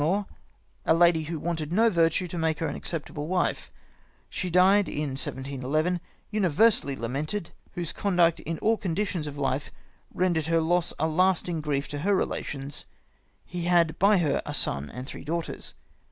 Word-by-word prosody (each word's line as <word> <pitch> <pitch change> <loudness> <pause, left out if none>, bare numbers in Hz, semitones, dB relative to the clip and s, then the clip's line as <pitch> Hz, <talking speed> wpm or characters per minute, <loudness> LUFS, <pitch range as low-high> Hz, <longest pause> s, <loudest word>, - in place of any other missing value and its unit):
33 155 +3 +2
more, 205 0 -2 0.6
a - - +6
Lady 170 -1 +4
who 165 +1 -4
wanted 160 -1 -3
no 220 +6 +4
Vertue 170 -3 +2
to 175 - -7
make 160 -2 0
her 165 - -1
an - - -4
accep 165 -3 -3
table 145 0 -6
Wife; 180 +1 0 0.6
she 185 - -3
dyed 190 +3 +5
in 150 -1 -2
1711, 140 +5 -1 0.3
universally 195 -6 +3
lamented, 145 - -3 0.2
whose 175 -2 -3
Conduct 175 -4 +2
in 165 0 -4
all 225 +1 +3
Conditions 185 -3 -2
of 145 0 -7
Life 135 0 -1 0.4
render'd 175 -4 0
her 165 0 +3
Loss 170 +1 +2
a 160 - +1
lasting 175 0 +1
Grief 145 -2 -1
to 145 - -4
her 200 +6 +2
Relations, 140 -6 -3 0.6
he 175 -1 -5
had 170 -3 +3
by 200 +2 +5
her 155 -6 +1
a 145 - -3
Son 70 - 0
and 125 +1 -7
three - - -8
Daughters. 165 +2 -4
165 Hz, 170 wpm, -27 LUFS, 150-180 Hz, 0.6 s, a